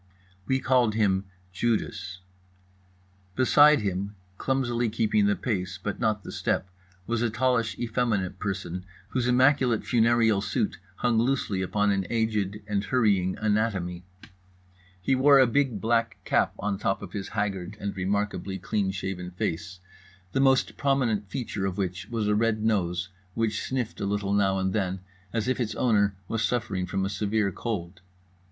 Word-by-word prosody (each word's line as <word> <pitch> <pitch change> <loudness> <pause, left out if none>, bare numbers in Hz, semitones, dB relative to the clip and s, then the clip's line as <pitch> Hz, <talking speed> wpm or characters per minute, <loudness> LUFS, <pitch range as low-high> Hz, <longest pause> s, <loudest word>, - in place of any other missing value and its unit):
We 130 0 +2
called 125 -5 +2
him 100 -3 +2 0.3
Judas. 100 -4 -2 1.1
Beside 145 +3 +6
him, 100 +1 -2 0.2
clumsily 120 -3 0
keeping 105 -2 +2
the 105 - +3
pace 90 -5 -2
but 100 +2 -4
not 110 -3 0
the - - -7
step, 95 - -1 0.3
was 115 +1 -1
a 120 - +2
tallish 115 0 +1
effeminate 110 -6 -1
person 95 -3 -3 0.3
whose 125 -2 0
immaculate 130 -2 +3
funereal 115 -3 +3
suit 100 -1 -1 0.2
hung 120 0 +1
loosely 115 -6 0
upon 105 +2 +1
an 95 -2 0
aged 105 -3 -1
and 105 -1 -1
hurrying 100 -7 +2
anatomy. 105 -5 0 1.0
He 90 +9 +1
wore 140 +2 +6
a 135 - +7
big 125 -3 +1
black 115 +2 +1
cap - - +2
on 100 -1 -2
top 95 - -1
of - - -9
his 100 -2 -4
haggard 100 -1 -2
and 100 0 -4
remarkably 100 0 -1
clean 100 +1 -1
shaven 95 -1 -4
face, 90 +1 -4 0.5
the - - 0
most 135 -1 +3
prominent 120 -8 +1
feature 110 -3 -3
of 95 0 -4
which 90 -2 -3
was 115 -3 -1
a 105 - +3
red 110 0 +1
nose, 95 -4 0 0.3
which 110 -2 0
sniffed 125 -4 -3
a 100 - -1
little 100 0 -1
now 95 -1 +2
and 95 0 0
then 95 -3 -1 0.3
as 115 0 -1
if 130 - 0
its 110 -3 -1
owner 100 -5 +2
was 115 -1 -1
suffering 100 -6 -1
from 95 0 -1
a - - 0
severe 105 0 0
cold. 95 -4 -4
105 Hz, 155 wpm, -27 LUFS, 95-115 Hz, 1.1 s, a